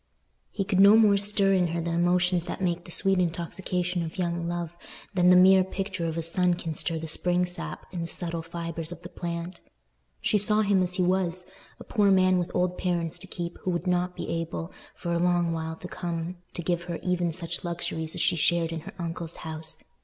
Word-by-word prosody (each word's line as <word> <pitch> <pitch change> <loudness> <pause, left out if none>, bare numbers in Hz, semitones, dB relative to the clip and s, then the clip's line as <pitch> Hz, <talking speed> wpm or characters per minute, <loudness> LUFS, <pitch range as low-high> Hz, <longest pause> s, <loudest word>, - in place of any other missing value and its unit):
He 200 - -2
could 190 -1 0
no 200 +2 +8
more 215 -3 +6
stir 200 -1 +2
in 180 -2 +3
her 170 +1 -2
the 170 +1 -2
emotions 175 +1 +2
that - - -5
make 175 -2 -1
the - - -11
sweet 195 +1 +3
intoxication 180 +1 -1
of 165 -1 -5
young 170 -2 -1
love 175 -1 -4 0.4
than 180 -1 +4
the 180 - +8
mere 185 +1 +7
picture 190 -2 -3
of 165 0 -3
a 165 - -1
sun 180 +2 +2
can 165 -2 -4
stir 165 +2 -1
the 160 0 -5
spring 180 +3 +1
sap 180 +1 -5
in 180 -2 -4
the 165 - -3
subtle 170 -1 -2
fibres 165 0 -5
of 175 - -9
the 175 - -8
plant. 170 0 -5 0.6
She 210 - +2
saw 210 +2 +5
him 200 -2 +3
as 180 0 -1
he 185 - +1
was—a 185 +1 -2
poor 205 -3 +2
man 185 -1 +4
with 175 - -2
old 180 0 0
parents 170 -3 -1
to - - +4
keep, 175 -1 -5
who - - -3
would 175 0 -1
not 180 0 0
be - - -5
able, 165 0 -4 0.2
for 170 -1 -3
a 170 - +1
long 175 -1 +2
while 160 0 -3
to 180 - -8
come, 175 0 -4 0.2
to 175 - -4
give 170 0 -1
her 170 -1 -4
even 180 -2 0
such 170 0 -2
luxuries 160 -2 -3
as - - 0
she - - +3
shared 165 0 +2
in 165 - -3
her 155 - -10
uncle's 170 -1 -5
house. 160 0 -7
175 Hz, 220 wpm, -27 LUFS, 170-185 Hz, 0.6 s, no